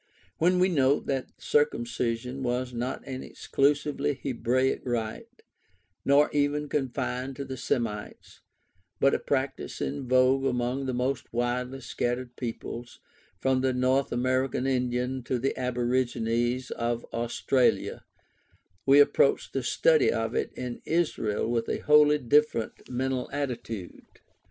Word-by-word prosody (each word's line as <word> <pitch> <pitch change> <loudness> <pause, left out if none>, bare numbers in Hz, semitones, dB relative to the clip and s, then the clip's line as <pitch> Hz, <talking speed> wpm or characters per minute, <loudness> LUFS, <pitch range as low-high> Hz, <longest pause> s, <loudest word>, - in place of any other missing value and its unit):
When 180 +3 +4
we 180 +1 +4
note 140 -5 +2
that 135 -1 -2
circumcision 125 -2 0
was 125 0 -1
not 120 +2 -3
an 130 -1 -5
exclusively 145 0 0
Hebraic 130 0 0
rite, 115 -3 -4 0.6
nor 140 +2 +4
even 145 +1 +1
confined 130 -1 -2
to 140 - -5
the 130 - -5
Semites, 115 -4 -3 0.6
but 135 - +4
a - - +1
practice 135 -1 -2
in 140 -2 -3
vogue 130 +1 +4
among 125 +1 -1
the 130 - -1
most 125 +1 -2
widely 125 +2 -2
scattered 120 0 -3
peoples, 120 0 -6 0.4
from 130 +2 +2
the 130 -1 +1
North 130 +2 +1
American 130 +1 0
Indian 125 0 0
to 130 - 0
the 135 +3 -1
aborigines 125 -1 0
of 120 0 -2
Australasia, 120 +2 +1 0.8
we 140 +1 +7
approach 140 -1 +4
the 135 - -1
study 155 +6 +3
of 115 0 -1
it - - -1
in 125 -1 -6
Israel 150 -12 0
with 115 -1 -1
a - - 0
wholly 150 0 +5
different 145 -3 +1
mental 130 0 -2
attitude. 125 -9 -5
130 Hz, 125 wpm, -28 LUFS, 120-135 Hz, 0.8 s, we